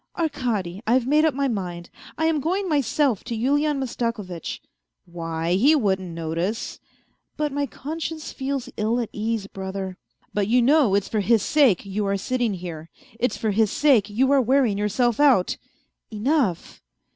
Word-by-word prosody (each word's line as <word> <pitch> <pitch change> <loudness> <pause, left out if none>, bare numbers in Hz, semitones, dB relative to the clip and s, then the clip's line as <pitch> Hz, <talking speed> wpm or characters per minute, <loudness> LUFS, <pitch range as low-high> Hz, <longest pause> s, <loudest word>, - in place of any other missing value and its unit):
" - - -49
Arkady, 235 - -2
I've 245 +2 +3
made 300 +4 +4
up 315 - +2
my 280 0 +1
mind, 180 -7 -4 0.3
I 320 - 0
am 320 -2 +2
going 370 +7 -1
myself 280 - +1
to 235 -1 -3
Yulian 290 +5 +1
Mastakovitch." 230 - -4 0.3
" - - -60
Why, 165 -1 -3
he 265 +12 +5
wouldn't 190 -8 0
notice 170 +6 -3 0.2
" - - -40
" - - -50
But 300 -1 -1
my 285 0 -1
conscience 315 +4 -6
feels 270 -1 -3
ill 220 +3 +1
at 235 - -2
ease, 220 -1 -2
brother." 190 -1 -6 0.2
" - - -40
But 205 -2 0
you 245 +3 +4
know 255 -4 +4
it's 200 -1 +1
for 220 - -1
his 215 +1 +3
sake 270 - +3
you 200 +1 -2
are 200 0 +1
sitting 240 0 -1
here; 165 -3 -7 0.3
it's 245 -2 0
for 220 - 0
his 215 0 +2
sake 250 -9 +3
you 260 +6 +2
are 280 -1 +5
wearing 255 -3 +2
yourself 230 +3 +1
out." 270 -11 +4 0.3
" - - -53
Enough 220 - -1
230 Hz, 180 wpm, -24 LUFS, 195-280 Hz, 0.3 s, he